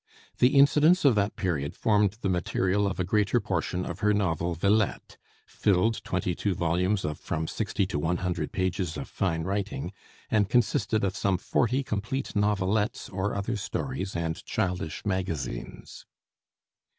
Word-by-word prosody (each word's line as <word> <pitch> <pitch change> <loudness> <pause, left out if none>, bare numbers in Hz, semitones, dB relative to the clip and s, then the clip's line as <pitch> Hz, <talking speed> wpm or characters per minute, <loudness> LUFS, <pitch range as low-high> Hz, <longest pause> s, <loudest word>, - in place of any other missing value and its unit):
The 125 +3 +4
incidents 150 +5 +5
of 135 - +7
that 105 -1 0
period 75 -6 -2
formed 105 -1 +2
the - - 0
material 95 +2 +1
of 95 - -3
a - - +2
greater 105 +3 +2
portion 90 0 -2
of - - -5
her 105 0 +3
novel 85 -3 0
'Villette,' 100 +4 +1 0.3
filled 105 +3 +1
twenty 90 0 -1
two 95 +1 -1
volumes 90 +4 +1
of 75 0 -3
from 80 0 -3
sixty 105 +1 -1
to 90 -5 -3
one 80 +4 0
hundred 85 -4 -2
pages 90 -2 -1
of - - -5
fine 85 -4 -1
writing, 100 +4 -3 0.4
and 105 -3 +3
consisted 110 -3 +2
of 95 -1 0
some 95 -2 +1
forty 125 +8 +1
complete 115 +4 -3
novelettes 105 0 0
or 95 +2 -2
other 100 +4 -2
stories 105 0 -3
and 80 -1 -2
childish 90 -4 -2
"magazines." 80 -11 -4
95 Hz, 150 wpm, -27 LUFS, 90-105 Hz, 0.4 s, of